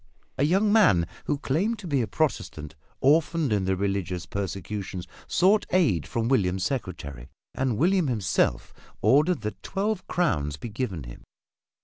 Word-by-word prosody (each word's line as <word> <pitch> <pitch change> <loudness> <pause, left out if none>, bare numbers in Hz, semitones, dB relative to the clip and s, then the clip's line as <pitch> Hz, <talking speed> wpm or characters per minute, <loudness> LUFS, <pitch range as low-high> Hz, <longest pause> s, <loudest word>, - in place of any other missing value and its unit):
A - - +3
young 200 +6 +3
man, 175 - +5 0.2
who 145 - 0
claimed 175 +12 0
to 210 - -10
be 140 -5 +1
a 115 - -1
Protestant 90 - -2 0.3
orphaned 155 -1 +3
in 100 -3 +1
the 95 0 +1
religious 95 -2 -2
persecutions, 95 -1 -4 0.2
sought 195 +4 +3
aid 135 - +2
from 115 -2 -1
William's 95 -7 +1
secretary, 70 - -4 0.2
and 130 -4 -1
William 180 - +3
himself 100 - 0 0.3
ordered 150 +2 +4
that 105 -1 -5
twelve 200 0 -2
crowns 75 - 0
be 115 - -6
given 105 - -3
him. - - -11
115 Hz, 145 wpm, -26 LUFS, -, 0.3 s, man